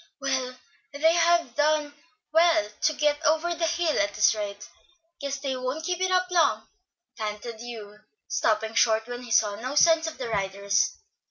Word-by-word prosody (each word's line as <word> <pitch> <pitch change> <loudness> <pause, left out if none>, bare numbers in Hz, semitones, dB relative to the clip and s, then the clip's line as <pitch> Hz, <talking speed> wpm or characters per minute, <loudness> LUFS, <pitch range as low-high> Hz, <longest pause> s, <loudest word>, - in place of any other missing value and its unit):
"Well, 260 -2 -2 0.4
they 320 +3 +3
have 340 -5 +2
done 295 0 +1 0.4
well 325 -6 +3
to 310 - +3
get 295 0 0
over 320 +3 +2
the 335 0 -1
hill 335 -2 0
at 200 0 0
this 210 - +4
rate. 205 -1 -6 0.5
Guess 280 -2 -3
they 270 -2 -2
won't 255 +5 -4
keep 360 0 -2
it 375 - +1
up 365 0 +1
long," 345 -2 +2 0.5
panted 215 +1 -5
Hugh, 220 -3 -9 0.3
stopping 220 - 0
short 220 -1 +3
when 245 +1 -7
he 245 - -11
saw 210 -2 +3
no 255 +5 -5
signs 325 +1 +4
of 320 - -6
the 250 - -5
riders. 200 0 0
275 Hz, 170 wpm, -26 LUFS, 220-320 Hz, 0.5 s, this